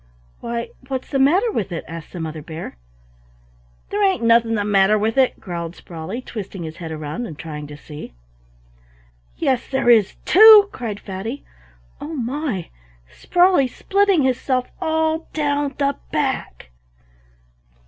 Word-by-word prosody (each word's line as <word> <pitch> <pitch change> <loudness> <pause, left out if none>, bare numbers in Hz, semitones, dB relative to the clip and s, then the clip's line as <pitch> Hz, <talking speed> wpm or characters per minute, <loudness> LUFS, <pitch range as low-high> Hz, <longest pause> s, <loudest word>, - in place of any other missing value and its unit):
"Why, 235 0 -4 0.2
what's 260 -1 -4
the 275 - +1
matter 360 - +3
with 200 - -3
it?" 165 - -5
asked 165 -1 -9
the 180 - -7
Mother 160 -1 -5
Bear. 160 - -8 1.2
"There 415 +1 0
ain't 380 -10 +2
anything 230 0 +4
the 205 -1 -1
matter 205 +1 +4
with 220 +2 0
it," 265 -1 +2
growled 170 -2 -5
Sprawley, 175 +8 -7
twisting 195 -6 -7
his 160 0 -7
head 165 -2 -7
round 155 +9 -5
and 155 - -9
trying 150 -2 -7
to 145 0 -10
see. 150 - -10 1.2
"Yes, 255 -2 0
there 265 -3 +3
is 215 -4 +4
too!" 420 +1 +9
cried 220 -5 -5
Fatty. 215 +8 -6 0.6
"Oh 320 +2 -5
my! 250 - -3 0.4
Sprawley's 355 - +2
splitting 395 -5 +2
hisself 255 0 0
all 320 0 0
down 285 -2 -1
the 280 -1 +1 0.2
back." 265 - -2
235 Hz, 140 wpm, -21 LUFS, 175-290 Hz, 1.2 s, too